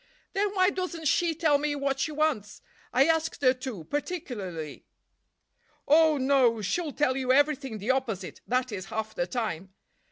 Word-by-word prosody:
"Then 405 +1 0
why 370 0 +4
doesn't 350 -4 -3
she 335 +2 +2
tell 300 -3 +3
me 295 0 -1
what 275 -1 -1
she 305 - 0
wants? 295 -9 -1 0.3
I 265 +2 +4
asked 325 -2 0
her 255 -1 +6
to, 250 - -6
particularly." 200 - -5 1.0
"Oh, 310 +1 +5
no! 260 -4 +3
She'll 315 - -1
tell 275 -2 +1
you 260 -1 0
everything 275 -4 +2
the 210 +5 0
opposite—that 250 +1 -2
is, 190 -3 -5
half 220 +2 -4
the 175 - -2
time. 190 -4 -4
270 Hz, 155 wpm, -28 LUFS, 220-310 Hz, 1.0 s, her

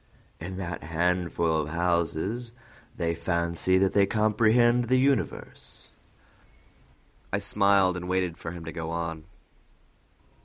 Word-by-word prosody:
"In 95 +3 -6
that 85 -4 -5
handful 85 0 0
of 75 - -5
houses 85 +7 -1 0.4
they 85 -1 0
fancy 85 +2 0
that 95 0 +2
they 100 -1 +4
comprehend 115 +3 +3
the 130 +2 +2
universe." 135 -2 -2 1.4
I - - +1
smiled, 100 -2 +3
and 90 0 -6
waited 90 -2 0
for 85 - -7
him 85 -1 -8
to 80 - -5
go 80 -1 -5
on. 80 -1 -4
90 Hz, 120 wpm, -27 LUFS, 85-105 Hz, 1.4 s, they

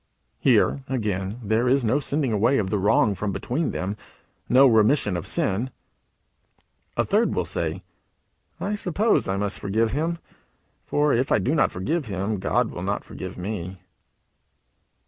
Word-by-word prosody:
Here, - - +3
again, 105 -4 -2
there 110 +4 +1
is 135 -1 +2
no 130 +6 +2
sending 140 -2 -1
away 115 +6 +2
of 95 -3 -1
the 105 - +1
wrong 100 +1 +3
from 100 +1 -3
between 140 - -2
them 95 +3 -3 0.5
no 130 +3 +7
remission 110 -3 +3
of 85 - -4
the - - -4
sin. 110 +7 0 1.3
A - - +2
third - - +2
will - - 0
say: 85 +2 -3 0.8
"I 205 - -2
suppose 205 +2 +1
I 95 - 0
must 100 0 -1
forgive 110 +3 0
him; 165 +5 -1 0.7
for 145 0 +2
if 125 +3 0
I - - +5
do 135 - 0
not 155 - +3
forgive 145 - -2
him, 100 +1 -2
God 95 - 0
will - - -7
not - - -2
forgive - - -8
me." 95 -1 -5
110 Hz, 160 wpm, -24 LUFS, 100-140 Hz, 1.3 s, no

